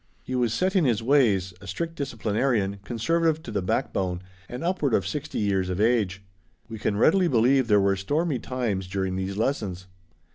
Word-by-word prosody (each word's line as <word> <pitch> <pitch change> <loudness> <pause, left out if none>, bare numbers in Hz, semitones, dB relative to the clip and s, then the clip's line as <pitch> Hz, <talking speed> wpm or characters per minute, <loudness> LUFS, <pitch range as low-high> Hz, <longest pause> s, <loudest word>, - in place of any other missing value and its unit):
He 130 - -6
was 125 -3 +1
set 185 - 0
in 185 - +4
his 115 -5 +1
ways, 110 -9 +3
a 100 - -11
strict 165 - -3
disciplinarian, 115 -6 -1
conservative 160 +9 0
to - - -7
the 100 -2 -1
backbone, 90 0 -1 0.3
and 125 +6 -6
upward 170 -8 +1
of 95 - 0
sixty 145 +10 -4
years 95 -3 0
of 90 +1 -2
age. 105 -4 +1 0.4
We 115 -1 -8
can 100 -1 -1
readily 180 - +4
believe 130 0 +3
there 105 -2 +5
were 100 0 +2
stormy 145 - -1
times 115 -8 -2
during 95 0 -2
these 95 +1 -3
lessons. 105 -7 -2
115 Hz, 180 wpm, -25 LUFS, 95-140 Hz, 0.4 s, there